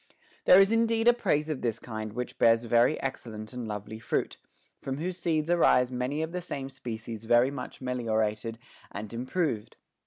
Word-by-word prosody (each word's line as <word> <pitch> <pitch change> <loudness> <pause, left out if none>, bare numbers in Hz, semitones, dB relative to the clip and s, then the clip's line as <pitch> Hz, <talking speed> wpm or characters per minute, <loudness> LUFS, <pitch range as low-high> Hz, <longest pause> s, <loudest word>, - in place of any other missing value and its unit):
There 185 - +8
is 195 +2 +5
indeed 230 0 +2
a 240 - +8
praise 160 -10 0
of 155 -4 -3
this 115 -2 -1
kind 110 -3 -6
which 125 +1 -5
bears 115 0 +5
very 120 +5 +3
excellent 110 -5 -5
and 125 -2 -5
lovely 105 +1 -6
fruit, - - -2 0.4
from 135 0 -3
whose 180 +4 -3
seeds 160 -3 0
arise 130 -7 +4
many 130 +5 -1
of 160 - -4
the 180 0 -3
same 135 -6 -5
species 115 -3 -6
very 120 +3 +4
much 135 -2 -7
meliorated 115 -3 -1 0.3
and 105 +2 -7
improved. 125 - -2
125 Hz, 175 wpm, -28 LUFS, 115-155 Hz, 0.4 s, There